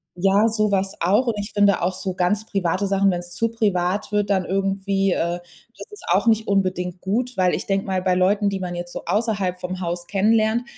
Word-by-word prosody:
Ja, 195 +4 +3
sowas 200 -3 0
auch. 205 +9 +2
Und 230 - +1
ich 205 +1 -5
finde 205 -1 +3
auch 180 +2 0
so 185 0 -4
ganz 185 +4 0
private 195 -1 -1
Sachen, 195 0 +3
wenn 175 - -2
es 175 0 -6
zu 230 +4 0
privat 200 -3 -1
wird, 205 -1 0
dann 190 -2 +1
irgendwie, 195 0 0
äh 175 0 -1 0.4
das 455 - -10
ist 415 - -12
auch - - +3
nicht 220 0 +3
unbedingt 185 -2 -1
gut. 240 +5 -2
Weil 180 -1 +3
ich - - -3
denke 195 0 0
mal, 190 -1 -1
bei 185 -1 +1
Leuten, 200 +3 +2
die 195 -1 -3
man 180 -1 -4
jetzt 175 0 -6
so - - -6
außerhalb 200 -5 0
vom 185 +1 -5
Haus 175 -1 -4
kennenlernt, 220 +3 +2
195 Hz, 215 wpm, -22 LUFS, 180-210 Hz, 0.4 s, Ja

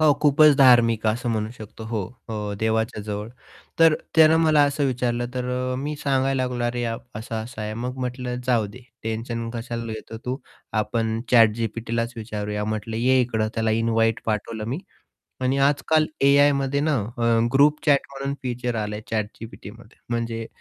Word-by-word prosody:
हो, 155 -2 +6
खूपच 150 0 +6
धार्मिक 120 -5 +5
असं 120 +3 0
म्हणू 110 -1 -1
शकतो. 110 +1 -9
हो 110 -2 -2 0.3
अ, 105 -2 -3
देवाच्याजवळ 110 -1 -2 0.5
तर 165 -1 +6 0.2
त्यानं 160 0 +7
मला 155 -2 +5
असं 145 0 0
विचारलं 120 -1 -1
तर 125 -1 -2 0.3
अ, - - -2
मी 145 +3 -3
सांगायला 135 -1 +1
लागलो, 125 -1 -2
अरे, 120 0 -1 0.3
असा-असा 110 +1 -6
आहे 105 0 -4
मग 125 +3 -4
म्हटलं 125 -1 -3
जाऊदे, 115 -2 0 0.2
टेन्शन 115 +1 -3
कशाला 115 -1 -4
येतं? 110 +1 -8
तू 125 +1 -2 0.4
आपण 110 +1 -1
ChatGPTलाच 115 +1 +2
विचारूया. 105 -2 -4
म्हटलं 110 +1 -3
ये 130 +3 +3
इकडं. 110 -3 0
त्याला 110 -1 0
इन्व्हाईट 115 0 +1
पाठवलं 110 0 -2
मी. 135 - -2 0.6
आणि 130 +2 +1
आजकाल 155 +2 +2
एआयमध्ये 140 0 +4
ना 150 0 +1 0.2
अ, - - -1 0.3
ग्रुप 145 +2 +5
चॅट 140 -1 +4
म्हणून 140 0 -4
फीचर 125 -1 -2
आलंय 105 -1 -3
ChatGPTमध्ये 110 0 -6
म्हणजे, 115 -1 -2
115 Hz, 150 wpm, -24 LUFS, 110-135 Hz, 0.6 s, त्यानं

